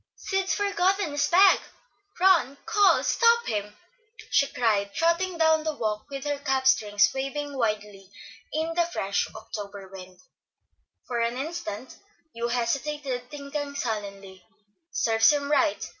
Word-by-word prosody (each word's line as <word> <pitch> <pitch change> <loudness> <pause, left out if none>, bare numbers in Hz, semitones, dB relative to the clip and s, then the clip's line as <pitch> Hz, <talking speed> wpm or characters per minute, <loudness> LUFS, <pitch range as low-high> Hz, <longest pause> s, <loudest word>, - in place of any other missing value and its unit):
"Sid's 385 -1 -1
forgotten 390 -3 +1
his 290 0 +1
bag. 375 +4 +6 0.6
Run, 355 -7 +4
call, 420 -3 +4
stop 470 0 +3
him!" 210 -1 -3 0.5
she 280 - +4
cried, 205 -5 0
trotting 340 +2 +1
down 320 -1 +3
the 310 -1 -2
walk 215 -4 -3
with 275 -1 -6
her 290 -1 -2
cap 265 -2 -1
strings 205 -5 +4
waving 280 +2 -4
wildly 210 -5 -3 0.4
in 320 +1 -2
the 340 0 +1
fresh 200 - -1
October 200 -2 -8
wind. 185 -1 -11 0.9
For 240 -2 -3
an 235 +1 -1
instant 280 -5 -6 0.4
Hugh 235 +1 -3
hesitated, 250 +1 -2
thinking 285 -1 -5
sullenly, 200 -5 -5 0.5
"Serves 225 -1 +3
him 290 -1 +1
right. 300 +1 +1
275 Hz, 130 wpm, -26 LUFS, 215-320 Hz, 0.9 s, bag